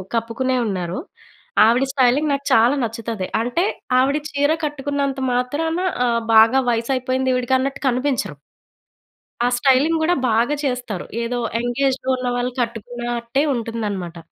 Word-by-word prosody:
కప్పుకునే 235 +3 -1
ఉన్నారు. 180 -1 -3 0.7
ఆవిడ 235 +4 +3
స్టైలింగ్ 275 +3 +3
నాకు 280 0 -3
చాలా 235 +5 +5
నచ్చుతది. 225 -4 -4
అంటే 245 +9 0 0.4
ఆవిడ 275 +3 +2
చీర 285 +1 +1
కట్టుకున్నంత 280 -1 -2
మాత్రాన 290 +7 -1 0.3
ఆహ్, 235 -1 +1
బాగా 225 +4 +7
వయసు 230 +2 -1
అయిపోయింది 255 0 0
ఈవిడకి 250 +1 +1
అన్నట్టు 270 +1 -3
కనిపించరు. 255 - 0 1.1
ఆ - - +3
స్టైలింగ్ 275 +5 +3
కూడా 350 +3 +2
బాగా 235 +6 +2
చేస్తారు. 245 -7 -3 0.2
ఏదో 240 +1 -2 0.2
ఎంగ్ 240 +1 -3
ఏజ్‌లో 265 0 -2
ఉన్నవాళ్ళు 245 0 -1
కట్టుకున్నట్టే 240 +2 -3
ఉంటుందన్నమాట. 210 -7 -4
245 Hz, 125 wpm, -21 LUFS, 230-270 Hz, 1.1 s, బాగా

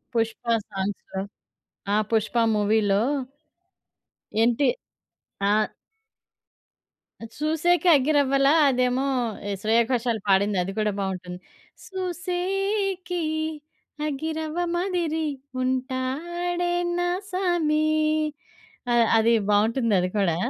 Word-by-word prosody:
'పుష్ప' 230 +1 0 0.2
సాంగ్స్‌లో 195 0 -4 0.7
ఆ! - - +3 0.2
'పుష్ప' 225 +1 +2
మూవీలో 205 -1 +2 1.4
ఏంటి? 240 +4 +3 0.8
ఆహ్ 215 +1 +2 1.7
'చూసేకె 325 +4 +1
అగ్గిరవ్వల' 275 0 +3 0.2
అదేమో 255 +1 +1 0.4
ఏహ్, 200 -1 -2
శ్రేయాఘోషలు 230 +1 +1
పాడిందది 195 -1 +2
కూడా 210 -1 +1
బాగుంటుంది. 185 -2 -4 0.5
'సూసేకి 370 +1 -2 0.9
అగ్గిరవ్వ 315 +3 -3 0.2
మాదిరి 345 -4 -1 0.4
ఉంటాడే 300 +8 -2 0.3
నా 350 0 +1 0.2
సామి' 345 -5 +1 1.1
అ - - +3 0.2
అది 225 +1 +4 0.2
బావుంటుంది 225 +3 +2
అది 180 0 0
కూడా. 180 -5 +2
260 Hz, 75 wpm, -25 LUFS, 215-345 Hz, 1.7 s, అది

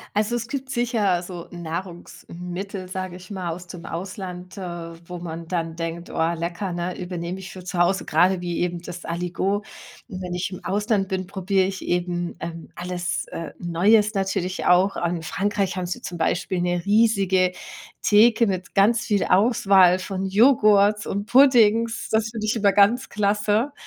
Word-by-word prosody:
Also, 215 +3 +1
es 230 -1 -3
gibt 265 +1 -5
sicher 225 -8 +1
so 175 -1 -8
Nahrungsmittel, 180 +2 -7
sage 185 -1 -5
ich 185 0 -14
mal, 185 -3 -4
aus 175 +2 -6
dem 175 -1 -9
Ausland, 180 +1 -7
äh, - - -6 0.5
wo 180 - -5
man 165 -1 -7
dann 165 -2 -2
denkt: 165 +1 -5
„Oh 165 +1 0
lecker, 170 +3 -3
ne, 175 +1 -4
übernehme 180 0 -5
ich 190 - -9
für 185 - -10
zu 180 0 -5
Hause,“ 180 +2 +2
grade 180 +3 +3
wie 175 -1 -3
eben 175 -1 -1
das 175 +1 -8
Aligot. 180 +4 -2 0.4
Wenn 185 -5 -6
ich 180 +2 -2
im 185 - -8
Ausland 205 0 0
bin, 190 -2 -2
probiere 190 0 +1
ich 190 0 -4
eben, 175 0 -1
ähm, 165 -1 -7
alles, 175 -1 -3
äh, 165 -2 -6
Neues 205 +5 +3
natürlich 190 -2 -2
auch. 185 +2 +4
In 170 -1 -1
Frankreich 195 +4 -1
haben 180 - -2
sie 175 - -4
zum 175 - -6
Beispiel 175 +2 0
'ne 175 -1 0
riesige 200 -4 +3 0.5
Theke 225 +2 +5
mit 185 -2 -3
ganz 215 +3 +4
viel 205 -3 +1
Auswahl 190 -3 +4
von 190 0 -4
Joghurts 210 -1 +4
und 200 +1 -3
Puddings. 230 -3 +4
Das 220 0 +1
finde 220 -1 -4
ich 215 - 0
immer 205 -3 +3
ganz 205 +5 +3
klasse. 210 +5 +1
185 Hz, 170 wpm, -23 LUFS, 175-205 Hz, 0.5 s, Theke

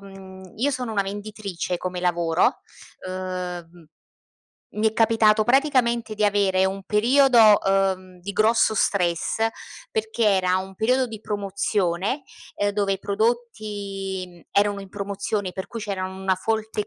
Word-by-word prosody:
mhmm, 190 -1 -12
io 265 +6 +1
sono 250 -4 -3
una 200 -2 +1
venditrice 200 -3 -4
come 180 0 -4
lavoro, 170 -1 +1 0.5
uhm, 180 -2 -6 0.9
mi 215 +1 +2
è 220 - -10
capitato 220 -1 +4
praticamente 240 -4 +2
di 210 0 0
avere 200 -2 +2
un 195 +1 -2
periodo, 230 0 +5
uhm, 190 -1 0
di 200 +3 -6
grosso 220 +2 +3
stress 185 +2 +1 0.4
perché 220 +1 -1
era 185 -3 +3
un 190 +1 -5
periodo 255 +6 +2
di 220 -3 -9
promozione, 200 - -1 0.3
ehm 205 0 +1
dove 200 -1 0
i 190 - -7
prodotti, 205 -3 -2
mhmm, 175 - -17
erano 205 0 +1
in 195 - -10
promozione 200 0 -3
per 190 0 -6
cui 230 - -7
c'era 200 -3 -3
una 190 0 -1
folte 220 +1 -2
200 Hz, 140 wpm, -24 LUFS, 190-220 Hz, 0.9 s, periodo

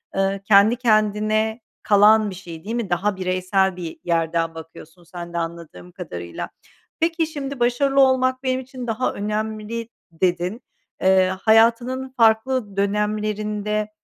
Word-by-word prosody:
ııı, 195 0 0
kendi 205 +3 +5
kendine 215 -1 +1 0.2
kalan 210 +1 +5
bir 185 - -7
şey, 170 -2 -10
değil 225 +3 -4
mi? 235 -5 -3
Daha 190 +3 0
bireysel 185 +1 0
bir 170 -3 -7
yerden 165 -1 0
bakıyorsun 165 +1 -12
sen 170 0 -9
de 170 - -3
anladığım 165 - -6
kadarıyla. 85 -1 -7 0.5
Peki, 330 0 +1
şimdi 280 -4 -6
başarılı 270 +3 +2
olmak 260 0 +2
benim 260 0 0
için 255 -1 -8
daha 230 +3 -1
önemli 215 +2 -4 0.2
dedin. 180 +5 -1 0.4
Eee, 190 0 +4
hayatının 235 +4 +3
farklı 225 -1 +2
dönemlerinde, 210 +1 -1
210 Hz, 130 wpm, -22 LUFS, 185-235 Hz, 0.5 s, kendi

